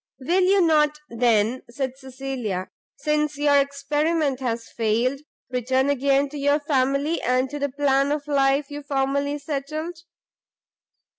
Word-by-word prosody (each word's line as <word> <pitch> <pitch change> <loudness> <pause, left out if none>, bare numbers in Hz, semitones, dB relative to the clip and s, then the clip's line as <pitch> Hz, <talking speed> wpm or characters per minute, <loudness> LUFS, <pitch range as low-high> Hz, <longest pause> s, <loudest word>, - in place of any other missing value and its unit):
"Will 340 +8 +1
you 385 +2 +4
not 300 -3 +3
then," 230 0 +2
said 260 +1 -3
Cecilia, 260 -8 -5 0.3
"since 300 -1 -1
your 290 -1 +4
experiment 280 +1 0
has 235 -3 -3
failed, 235 +4 0 0.3
return 260 +2 +1
again 280 +1 +2
to 295 +1 -7
your 285 +1 +2
family, 280 +2 0
and 255 +1 +1
to 290 - -4
the 285 0 -1
plan 275 0 +1
of 295 -1 -2
life 275 0 +2
you 290 0 -5
formerly 280 +1 -1
settled?" 305 +4 -4
280 Hz, 135 wpm, -24 LUFS, 260-295 Hz, 0.3 s, you